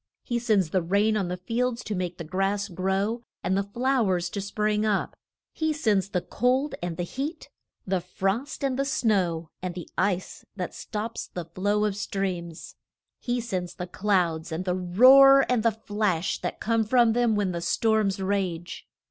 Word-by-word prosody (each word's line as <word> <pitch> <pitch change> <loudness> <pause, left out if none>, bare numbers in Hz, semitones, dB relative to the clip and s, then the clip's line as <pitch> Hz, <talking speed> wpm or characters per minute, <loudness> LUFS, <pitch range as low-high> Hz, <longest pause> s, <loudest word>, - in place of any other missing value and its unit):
He 240 -2 -1
sends 210 -8 +1
the 185 - +2
rain 200 +5 +2
on 200 -4 0
the 180 +1 -3
field 230 +6 -1
to 215 - -3
make 180 -2 -3
the 170 - -5
grass 195 +4 -1
grow 195 +5 -1 0.2
and 190 - +1
the 195 - +2
flow 240 +2 0
ers 175 -1 0
to 200 - -3
spring 210 +1 0
up. 210 -2 0 0.4
He 315 -1 0
sends 210 -10 +1
the 180 -3 -1
cold 260 +5 0
and 175 -2 -4
the 175 - -1
heat, 285 - -5 0.3
the 185 -1 0
frost 195 +11 -2
and 270 -1 0
the - - +3
snow, 185 - 0
and 180 -1 -4
the 175 - -7
ice 185 -1 -1
that 180 -3 -4
stops 220 +2 -5
the 175 -2 -6
flow 205 +5 0
of 210 - 0
the 200 - -7
streams. 180 -5 -4 0.5
He 245 0 -1
sends 185 -7 -4
the 180 - -4
clouds, 175 -4 0
and 165 +3 -3
the 180 - +1
roar 260 +10 +7
and 250 -3 +2
the 230 - +4
flash 205 -5 -1
that - - -4
come 225 0 +1
from 235 0 +4
them 240 -2 +2
when 205 -3 0
the 170 -1 -4
storms 215 0 +1
rage. 190 -3 -2
200 Hz, 185 wpm, -26 LUFS, 180-230 Hz, 0.5 s, roar